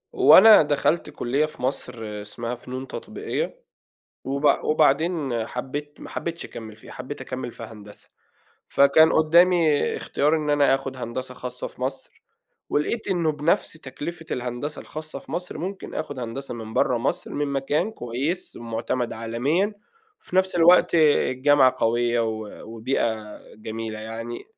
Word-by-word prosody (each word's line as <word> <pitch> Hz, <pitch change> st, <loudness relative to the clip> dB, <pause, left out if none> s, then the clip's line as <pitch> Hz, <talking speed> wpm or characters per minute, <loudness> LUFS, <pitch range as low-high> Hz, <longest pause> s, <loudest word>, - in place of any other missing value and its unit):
هو 385 Hz, -, +8 dB
أنا 220 Hz, +3 st, +9 dB
دخلت 150 Hz, +3 st, +1 dB
كُلّية 135 Hz, +5 st, 0 dB
في 155 Hz, -, -10 dB
مصر 130 Hz, -1 st, -2 dB, 0.3 s
اسمها 115 Hz, +4 st, -5 dB
فنون 130 Hz, +2 st, -7 dB
تطبيقية -, -, -5 dB, 0.6 s
وبع 140 Hz, +2 st, +2 dB
وبعدين 150 Hz, -5 st, +1 dB
حبّيت 145 Hz, +5 st, -5 dB
ما -, -, -9 dB
حبيتش 170 Hz, 0 st, -4 dB
أكمّل 110 Hz, -2 st, -9 dB
فيها، -, -, -13 dB
حبّيت 130 Hz, +3 st, -7 dB
أكمّل 130 Hz, -2 st, -5 dB
في -, -, -11 dB
هندسة. 105 Hz, -2 st, -11 dB, 0.6 s
فكان 150 Hz, +3 st, +5 dB
قُدّامي 165 Hz, -1 st, +4 dB
اختيار 150 Hz, +3 st, +1 dB
إن 155 Hz, -2 st, -2 dB
أنا 145 Hz, -2 st, +4 dB
آخُد 135 Hz, -1 st, -6 dB
هندسة 130 Hz, +1 st, -5 dB
خاصة 125 Hz, 0 st, -6 dB
في -, -, -15 dB
مصر، 135 Hz, +1 st, -5 dB, 0.5 s
ولقيت 215 Hz, +10 st, -1 dB
إنه 170 Hz, -5 st, +1 dB
بنفس 150 Hz, +3 st, 0 dB
تكلفة 155 Hz, +3 st, -7 dB
الهندسة 125 Hz, +4 st, -4 dB
الخاصة 155 Hz, 0 st, -8 dB
في -, -, -14 dB
مصر 180 Hz, 0 st, -4 dB
ممكن 190 Hz, +3 st, -6 dB
آخد 145 Hz, -3 st, -4 dB
هندسة 125 Hz, +3 st, -5 dB
من 110 Hz, -1 st, -8 dB
برّه 125 Hz, -, +2 dB
مصر، 120 Hz, +4 st, -2 dB
من 145 Hz, 0 st, -1 dB
مكان 140 Hz, +8 st, 0 dB
كويس، 140 Hz, -, -3 dB
مُعتمد 115 Hz, +1 st, -3 dB
عالميًا، 135 Hz, -, 0 dB, 0.5 s
في -, -, -9 dB
نفس 190 Hz, -1 st, +3 dB
الوقت 175 Hz, +1 st, +6 dB
الجامعة 145 Hz, -3 st, +4 dB
قويّة 120 Hz, +1 st, +1 dB
و 110 Hz, -2 st, -4 dB
وبيئة 110 Hz, -2 st, -2 dB, 0.2 s
جميلة 110 Hz, 0 st, -6 dB
يعني. 115 Hz, +2 st, -6 dB
135 Hz, 140 wpm, -24 LUFS, 120-155 Hz, 0.6 s, أنا